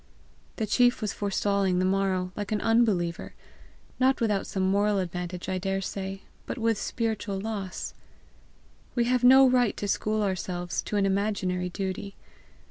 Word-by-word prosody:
The 220 - -1
chief 245 +3 +3
was 215 -3 -2
forestalling 200 -2 0
the 185 - +2
morrow 190 -1 0
like 205 0 -5
an 215 - +1
unbeliever 210 -8 +1 0.6
not 265 +1 +3
without 210 -4 0
some 190 - -2
moral 200 +2 +2
advantage, 180 -1 -4
I 185 -1 -1
dare 195 +1 -1
say, 195 0 -5 0.2
but - - -4
with 225 -2 +1
spiritual 220 -4 -2
loss. 200 -3 -4 1.0
We 240 - +3
have 250 +1 +1
no 265 +2 +8
right 250 -4 +2
to 205 - -3
school 215 +1 0
ourselves 180 -2 -2
to - - -5
an 200 -1 +3
imaginary 190 -2 0
duty. 190 +1 -4
200 Hz, 150 wpm, -27 LUFS, 185-220 Hz, 1.0 s, no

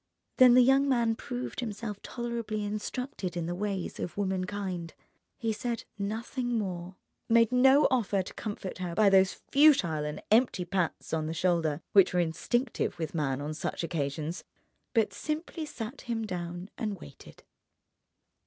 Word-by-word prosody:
Then 250 -2 +8
the 250 - +8
young 270 +2 +4
man 235 -3 +3
proved 250 0 -5
himself 210 -3 -4
tolerably 235 -3 -3
instructed 210 -3 -4
in 170 - -1
the 175 - -2
ways 195 -1 -3
of 175 - -5
womankind. 185 -3 -2 0.4
He 225 -1 -1
said 230 +1 -3
nothing 230 +4 -2
more, 185 -3 -4 0.3
made 230 0 +5
no 265 +3 +6
offer 205 -6 +1
to - - -9
comfort 205 -4 -5
her 175 -2 -3
by 205 0 +5
those 190 0 +5 0.2
futile 260 - +5
and 150 0 -4
empty 220 -5 +3
pats 180 -3 -2
on 155 -1 0
the 160 - -3
shoulder 165 -4 +1
which 190 -2 +6
are - - +4
instinctive 225 +9 -1
with 160 -2 -4
man 140 -4 -1
on 150 +2 -3
such 155 - -3
occasions, 155 0 -3 0.5
but 225 -2 +3
simply 310 +1 -4
sat 245 0 -6
him 230 -2 -3
down 175 0 -5
and 210 -5 -2
waited. 140 -3 -13
205 Hz, 155 wpm, -29 LUFS, 175-235 Hz, 0.5 s, Then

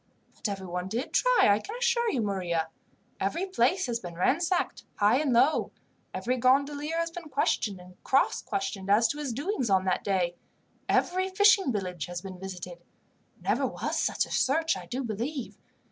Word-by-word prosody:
"But - - -3
everyone 185 -2 -4
did 230 +7 -3
try, - - +4
I 205 0 +4
can 420 - -7
assure 480 -1 +2
you, 250 - 0
Maria. 175 -5 -1 0.5
Every 265 - -1
place 375 0 +1
has 235 -2 -2
been 175 -5 -8
ransacked, 335 - 0
high 210 +4 +4
and 290 -2 +1
low. 265 +6 +3 0.4
Every 250 +2 -1
gondolier 285 +5 +2
has 335 0 -1
been 335 -2 -8
questioned 205 -8 0
and 180 0 -16
cross 270 - +2
questioned 195 0 -3
as 215 +3 +5
to 295 - -3
his 285 -4 -3
doings 280 - -2
on 190 -1 +3
that 185 -1 0
day. 185 -3 0 0.6
Every 370 +1 +1
fishing 390 -5 +5
village 180 -6 -3
has 175 0 -5
been 185 0 -9
visited. 180 -2 -7 0.6
Never - - +1
was - - -3
such - - +1
a - - -13
search, 315 +6 +2
I - - -8
do 260 +2 -3
believe. 240 +4 -4
240 Hz, 175 wpm, -28 LUFS, 190-315 Hz, 0.6 s, as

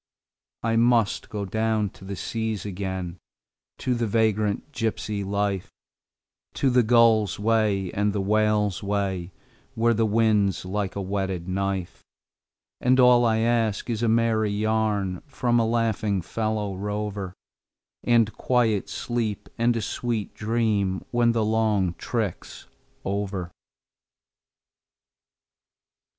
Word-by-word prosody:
I 115 0 +1
must 115 -2 +2
go 105 -2 -3
down 110 0 0
to - - -16
the 100 +1 -5
seas 110 0 -3
again, 95 -2 -4 0.6
to 125 - -1
the 120 -1 -1
vagrant 110 +3 0
gypsy 110 -5 -2
life, 100 -1 -1 0.8
To 135 - +2
the 125 0 +5
gull's 115 -2 +4
way 105 -4 +1
and 105 +1 +1
the 100 - -2
whale's 105 -1 +1
way, 100 -3 -2 0.4
where 115 +1 +3
the 115 0 +1
wind's 105 -4 +2
like 100 +1 -2
a 100 - -2
whetted 95 -2 -3
knife; 95 -1 -3 0.8
And 130 +1 +3
all 125 -1 +6
I 110 -1 +2
ask 115 -1 +1
is 110 -1 -2
a 120 - +2
merry 110 -1 +2
yarn 105 -3 0
from 120 -3 +1
a 115 - +2
laughing 110 -4 0
fellow 110 -1 -2
rover, 105 -1 -4 0.7
And 115 -3 +3
quiet 115 -5 +1
sleep 115 -4 -3
and 115 0 +2
a 110 - -2
sweet 115 -2 -3
dream 105 -4 0
when 120 -1 +3
the 115 -2 +1
long 105 -5 +1
trick's 110 -7 -4 0.4
over. 95 -2 -3
105 Hz, 120 wpm, -25 LUFS, 100-115 Hz, 0.8 s, all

